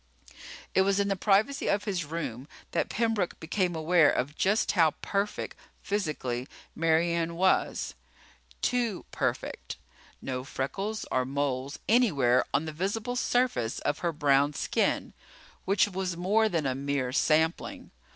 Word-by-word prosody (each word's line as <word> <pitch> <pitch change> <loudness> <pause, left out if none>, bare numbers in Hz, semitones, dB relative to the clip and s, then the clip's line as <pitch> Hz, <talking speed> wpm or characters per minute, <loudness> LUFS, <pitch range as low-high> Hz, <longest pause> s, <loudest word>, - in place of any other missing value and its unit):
It 190 - +4
was 195 +1 +2
in 200 0 +1
the 195 - +1
privacy 210 +8 +2
of 205 0 +1
his 190 -6 -2
room 145 -5 -5 0.2
that - - 0
Pembroke 225 -5 0
became 175 +1 -1
aware 160 -1 +4
of 140 +4 -1
just 205 +6 +2
how 165 -5 +3
perfect, 200 +1 -2 0.3
physically, 145 -11 -2 0.3
Mary 165 +1 +2
Ann 170 0 -1
was. 185 +2 +1 0.7
Too 240 -6 0
perfect. - - -3 0.4
No 130 -1 -4
freckles 195 +12 -3
or 130 - +2
moles 135 0 -2
anywhere 145 - +4
on 145 +3 +1
the 155 - -5
visible 210 +9 -2
surface 245 - +1
of 145 - -1
her 170 - 0
brown 145 -2 +3
skin, - - 0 0.5
which 195 +2 +3
was 185 -3 -3
more 210 +5 +2
than 165 -6 -1
a 130 - +1
mere 135 -1 -1
sampling. 160 +3 +1
170 Hz, 140 wpm, -28 LUFS, 140-200 Hz, 0.7 s, It